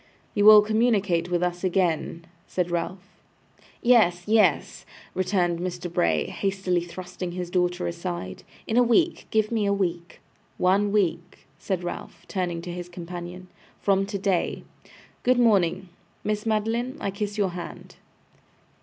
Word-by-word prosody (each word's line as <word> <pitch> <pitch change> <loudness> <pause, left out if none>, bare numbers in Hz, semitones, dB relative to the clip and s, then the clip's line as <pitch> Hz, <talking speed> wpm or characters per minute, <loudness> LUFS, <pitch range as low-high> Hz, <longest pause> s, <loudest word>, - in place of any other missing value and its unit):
'You 205 -1 +2
will 215 -1 +10
communicate 210 -6 +1
with 175 0 0
us 175 0 -2
again?' 175 -3 0 0.2
said 175 -1 -2
Ralph. 180 +3 -3 0.8
'Yes, 210 -8 +4
yes,' 210 -8 +2 0.3
returned 180 -2 0
Mr. 175 -1 -4
Bray, 80 - +2
hastily 190 -3 -1
thrusting 180 0 -7
his 180 -1 -5
daughter 180 0 0
aside. 175 0 -5 0.2
'In 225 - -1
a - - +7
week. 320 +9 +2
Give 215 0 +1
me 220 -3 +1
a - - +2
week.' 175 -3 -3 0.4
'One 200 +3 +2
week,' 180 -6 -1
said 185 -3 -2
Ralph, 175 - -7
turning 175 -3 -2
to 175 - -5
his 175 0 -6
companion, 175 +1 -8 0.3
'from 195 -1 +2
today. 195 -3 -1 0.6
Good 250 0 +3
morning. 195 -6 +3 0.4
Miss 210 +1 -2
Madeline, 225 +4 0
I 200 - -2
kiss 205 +1 -4
your 200 -2 +2
hand. 175 0 -9
185 Hz, 135 wpm, -25 LUFS, 175-205 Hz, 0.8 s, will